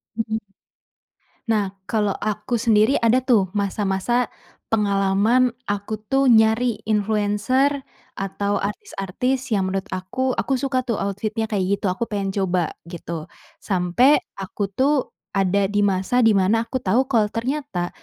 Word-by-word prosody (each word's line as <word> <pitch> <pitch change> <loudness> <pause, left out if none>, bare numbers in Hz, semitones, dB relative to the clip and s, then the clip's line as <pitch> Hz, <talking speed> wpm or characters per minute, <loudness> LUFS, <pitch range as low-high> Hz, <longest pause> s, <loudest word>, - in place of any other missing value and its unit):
Mhm. 220 0 -2 1.1
Nah 200 -3 0
kalo 210 0 0
aku 215 +3 -2
sendiri 225 +2 +3
ada 235 +3 +4
tuh 225 -8 +2
masa-masa, 205 +3 0 0.4
pengalaman 210 +4 +2 0.2
aku 205 +1 -3
tuh 270 +3 +2
nyari 220 0 +3
influencer, 215 +6 +1 0.3
atau 200 +1 -2
artis-artis 250 - -3
yang 200 -4 +1
menurut 195 +3 -3
aku 255 +8 -2
aku 270 - 0
suka 260 -1 -1
tuh 230 -4 -2
outfit-nya 215 +3 -2
kayak 200 -4 0 0.2
gitu - - -3
aku 230 +6 -2
pengen 200 -2 -2
coba 185 -4 0 0.2
gitu, 170 -2 -6 0.3
sampe 195 +9 +3 0.2
aku 195 +1 -3
tuh 265 +8 +2 0.4
ada 195 0 +2
di 205 +1 0
masa 200 +5 +2
di 225 - +5
mana 200 +4 +3
aku 260 - -3
tahu 250 +4 +1
kalau 225 -4 +3
ternyata, 235 -7 -2
210 Hz, 135 wpm, -22 LUFS, 195-245 Hz, 1.1 s, di